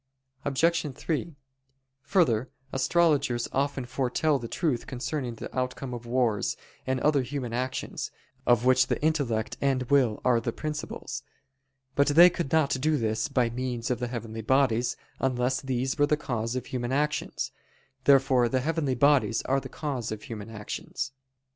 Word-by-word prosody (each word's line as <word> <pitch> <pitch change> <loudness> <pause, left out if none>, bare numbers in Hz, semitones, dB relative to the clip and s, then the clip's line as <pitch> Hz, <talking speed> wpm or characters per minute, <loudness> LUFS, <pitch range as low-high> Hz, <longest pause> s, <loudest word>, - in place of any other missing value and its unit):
Obj. 150 0 +1
3: 160 +1 -3 0.7
Further, 130 - +2 0.2
astrologers 140 -4 +2
often 140 -1 -1
foretell 135 +3 +1
the 120 - -5
truth 140 -1 -1
concerning 130 -1 -3
the - - -8
outcome 130 0 -2
of 120 -1 -7
wars, 120 -4 +1 0.3
and 130 0 +1
other 150 -2 +3
human 125 -2 -4
actions, 130 +2 -3 0.4
of 120 0 +4
which 130 0 +5
the - - 0
intellect 140 -9 0
and 135 -2 +2
will 125 -6 +4
are 120 -2 +4
the 115 - -1
principles. 150 +3 -5 0.7
But 140 - +3
they 170 +5 +8
could 170 -6 -3
not 160 -4 +3
do 155 +1 +2
this 110 -1 0
by 125 -4 +1
means 125 0 -3
of 125 - 0
the 125 - -2
heavenly 115 -2 -5
bodies, 125 0 +2 0.2
unless 130 0 +1
these 130 0 -1
were 145 - +5
the 150 - +2
cause 120 -4 -2
of 130 - -3
human 120 -1 -3
actions. 150 +2 -1 0.5
Therefore 135 -3 +5
the 130 0 +1
heavenly 150 -2 0
bodies 140 -3 +3
are 135 +1 +1
the - - -9
cause 135 -8 -3
of 110 -1 -5
human 110 -2 -7
actions. 110 +4 -5
130 Hz, 155 wpm, -28 LUFS, 120-145 Hz, 0.7 s, they